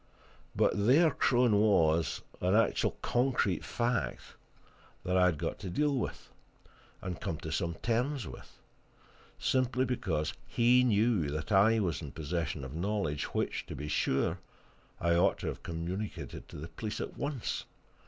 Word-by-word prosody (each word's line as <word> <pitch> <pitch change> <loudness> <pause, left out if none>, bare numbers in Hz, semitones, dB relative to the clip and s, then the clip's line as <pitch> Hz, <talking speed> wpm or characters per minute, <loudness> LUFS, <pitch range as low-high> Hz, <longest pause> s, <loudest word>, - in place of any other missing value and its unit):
But 100 +1 +2
there 155 +6 +6
Crone 120 -5 +3
was, 85 -6 +3 0.2
an 90 +3 +2
actual, 115 - +2
concrete 120 -7 +1
fact 120 0 -2 0.7
that 90 - 0
I 90 -1 +5
had 85 -4 +1
got 80 +2 -3
to 95 - -5
deal 145 +8 +1
with, 125 - -4 0.7
and 90 - -3
to - - -11
come 80 - -2
to 80 -3 -5
some 85 0 -1
terms 125 +6 -1
with, - - -11 0.8
simply 130 0 +1
because 85 - -1
he 125 +2 +4
knew 110 -8 +2
that 75 +5 -4
I 110 +3 +5
was 90 -6 -1
in 75 -3 -7
possession 80 -3 -3
of 65 - -8
knowledge 85 -4 -1
which, - - -1
to - - -6
be 75 +2 -5
sure, 80 +4 +1 0.6
I 85 0 +2
ought 85 - +3
to - - -3
have - - -6
communicated 90 +5 -5
to - - -11
the 80 +3 -7
police 105 +6 -5
at - - -5
once. 140 -5 -3
100 Hz, 155 wpm, -31 LUFS, 80-120 Hz, 0.8 s, there